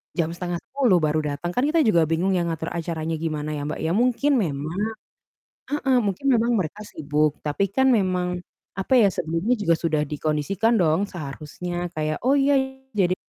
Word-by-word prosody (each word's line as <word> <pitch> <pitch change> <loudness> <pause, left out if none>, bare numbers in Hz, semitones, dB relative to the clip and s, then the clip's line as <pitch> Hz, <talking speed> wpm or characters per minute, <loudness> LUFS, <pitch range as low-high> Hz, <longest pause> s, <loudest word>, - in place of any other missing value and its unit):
jam 165 -1 0
9:30 180 +5 0
baru 155 +1 +2
dateng, 175 +5 -4
kan 250 +7 0
kita 325 +1 +3
juga 170 - +3
bingung 170 +4 +1
ya 170 - 0
ngatur 160 0 -3
acaranya 165 -1 -3
gimana 155 -2 -3
ya, 150 -1 -3
Mbak, 155 - -4
ya, 160 - 0
mungkin 250 +8 +2
memang 155 0 -2 0.9
heeh, 270 -3 +2
mungkin 200 +6 -3
memang 240 -2 +3
mereka 190 +4 -4
sibuk, 150 -4 -1
tapi 185 +7 0
kan 265 +4 +3
memang 180 -5 0 0.4
apa 195 +6 -1
ya, 210 - +6
sebelumnya 165 +9 0
juga 175 -6 +2
sudah 160 -2 0
dikondisikan 155 +9 0
dong 165 +5 +2
seharusnya, 175 +3 -5
kayak, 155 0 -1
"Oh, 270 +2 +4
ya, 280 +1 +3 0.4
jadi" 185 -3 +2
175 Hz, 165 wpm, -24 LUFS, 155-210 Hz, 0.9 s, ya